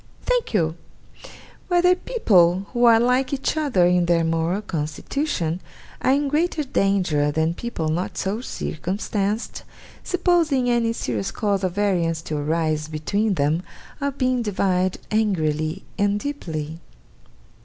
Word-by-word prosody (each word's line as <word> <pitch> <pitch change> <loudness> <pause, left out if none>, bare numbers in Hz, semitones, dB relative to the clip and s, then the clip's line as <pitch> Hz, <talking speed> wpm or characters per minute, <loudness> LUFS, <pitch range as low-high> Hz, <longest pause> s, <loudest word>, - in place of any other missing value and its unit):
'Thank - - 0
you: 160 -4 +1 0.9
whether 360 0 +4
people, 190 - +3
who 240 -1 +3
are 230 -1 +7
like 250 +2 +2
each 275 +2 -1
other 280 - +2
in 180 -1 +3
their 170 -1 +3
moral 165 +5 0
constitution, 170 - -2 0.4
are 260 - +3
in 285 +1 +1
greater 310 +2 0
danger 190 - +1
than 160 +2 0
people 175 -5 -4
not 170 +4 -2
so 205 +4 -2
circumstanced, 200 +2 -3 0.4
supposing 335 -8 +2
any 235 -1 +2
serious 115 - -2
cause 200 -2 -1
of 185 -2 0
variance 175 -6 0
to 155 - -4
arise 155 +1 0
between 195 +7 -1
them, 150 +2 +1 0.4
of 280 -1 -2
being 255 -2 +1
divided 185 -3 0
angrily 160 -5 0 0.2
and 205 0 +2
deeply? 160 - -5
195 Hz, 130 wpm, -23 LUFS, 165-250 Hz, 0.9 s, are